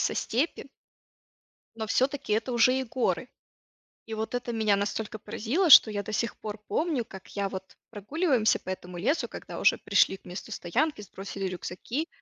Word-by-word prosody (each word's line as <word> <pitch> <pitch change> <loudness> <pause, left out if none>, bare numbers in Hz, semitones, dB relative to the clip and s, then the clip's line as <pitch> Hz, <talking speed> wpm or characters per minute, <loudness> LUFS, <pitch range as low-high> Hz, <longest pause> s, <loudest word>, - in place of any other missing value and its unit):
со - - +1
степи 265 +9 -1 1.1
но 220 -1 -4
всё-таки 260 0 0
это 225 +4 0
уже 250 +2 +4
и 265 - -1
горы. 250 +1 -1 0.8
И 225 - -5
вот 220 +2 -4
это 245 -1 -2
меня 220 -3 +2
настолько 210 +2 -3
поразило, 295 - 0
что 230 - +10
я 205 -1 -2
до 215 +2 -7
сих 230 +2 -1
пор 215 0 -6
помню, 305 -7 0
как 190 -3 -12
я 200 -1 0
вот 190 0 -8
прогуливаемся 240 - +1
по - - -15
этому 180 -1 -6
лесу, 290 - 0
когда - - -8
уже - - +4
пришли 195 - +3
к - - -31
месту 180 +5 -8
стоянки, 255 - -1
сбросили 195 0 -6
рюкзаки, 185 - -4
220 Hz, 170 wpm, -28 LUFS, 200-255 Hz, 1.1 s, что